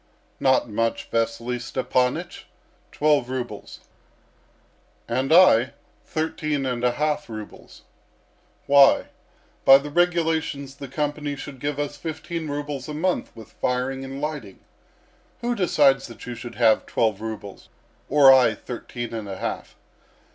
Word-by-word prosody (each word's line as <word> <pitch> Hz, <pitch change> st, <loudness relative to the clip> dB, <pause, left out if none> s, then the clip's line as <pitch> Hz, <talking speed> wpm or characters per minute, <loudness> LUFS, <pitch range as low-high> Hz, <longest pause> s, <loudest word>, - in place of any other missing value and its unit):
"Not 130 Hz, -2 st, +3 dB
much, 115 Hz, +1 st, -2 dB
Vasily 115 Hz, +2 st, -1 dB
Stepanych 125 Hz, 0 st, -1 dB, 0.5 s
twelve 145 Hz, -4 st, +2 dB
rubles." 125 Hz, -5 st, -6 dB, 1.3 s
"And 130 Hz, +4 st, -1 dB
I, 140 Hz, -8 st, +6 dB, 0.3 s
thirteen 155 Hz, -3 st, -2 dB
and 125 Hz, -2 st, -2 dB
a 125 Hz, -1 st, +2 dB
half 150 Hz, -2 st, -1 dB
rubles. 110 Hz, -2 st, -10 dB, 0.8 s
Why? 140 Hz, -1 st, +5 dB, 0.5 s
By 135 Hz, 0 st, +9 dB
the 145 Hz, +1 st, -7 dB
regulations 160 Hz, -5 st, 0 dB
the 140 Hz, -, -7 dB
company 145 Hz, +1 st, -3 dB
should 140 Hz, -1 st, -9 dB
give 145 Hz, +1 st, -3 dB
us 145 Hz, 0 st, -3 dB
fifteen 160 Hz, +1 st, -5 dB
rubles 145 Hz, -1 st, -4 dB
a 150 Hz, -, -5 dB
month 180 Hz, +4 st, -1 dB
with 110 Hz, -, -12 dB
firing 130 Hz, +2 st, -2 dB
and 135 Hz, +1 st, -7 dB
lighting. 145 Hz, -10 st, -5 dB, 0.8 s
Who 240 Hz, 0 st, 0 dB
decides 145 Hz, -, +3 dB
that 115 Hz, -3 st, -11 dB
you 125 Hz, -, -5 dB
should 120 Hz, +1 st, -9 dB
have 115 Hz, -2 st, +3 dB
twelve 110 Hz, -3 st, 0 dB
rubles, 105 Hz, -3 st, -7 dB, 0.4 s
or 140 Hz, -1 st, +8 dB
I 125 Hz, -4 st, +4 dB
thirteen 120 Hz, -1 st, -7 dB
and 110 Hz, -3 st, -5 dB
a 95 Hz, -, -5 dB
half? -, -, -5 dB
135 Hz, 130 wpm, -24 LUFS, 120-150 Hz, 1.3 s, By